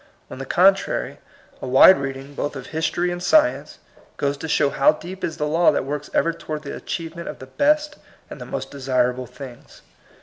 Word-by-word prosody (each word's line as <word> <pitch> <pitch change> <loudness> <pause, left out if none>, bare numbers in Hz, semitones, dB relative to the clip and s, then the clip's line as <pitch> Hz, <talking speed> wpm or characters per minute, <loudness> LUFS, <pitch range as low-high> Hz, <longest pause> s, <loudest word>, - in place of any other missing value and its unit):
On - - -8
the 135 - -6
contrary, 195 +5 +2 0.4
a - - -5
wide 135 +9 +7
read 135 -1 -4
ing, 135 +2 -12
both 145 +1 -4
of 130 -2 -7
history 165 +3 -1
and 175 0 -5
science, 310 - +2 0.4
goes 140 0 -1
to 160 - -6
show 145 -2 +2
how 140 - +4
deep 185 +5 -10
is 160 -1 -3
the 150 - -1
law 165 +3 +3
that - - -2
works 145 +1 -5
ever 165 - +1
towaitl 155 -2 -6
the 140 - -6
achievement 170 0 -6
of - - -6
the 130 - -10
best 300 - +1 0.3
and - - -10
the - - -6
most - - -5
desirable 130 -2 -1
things. 125 0 -12
150 Hz, 200 wpm, -22 LUFS, 135-175 Hz, 0.4 s, wide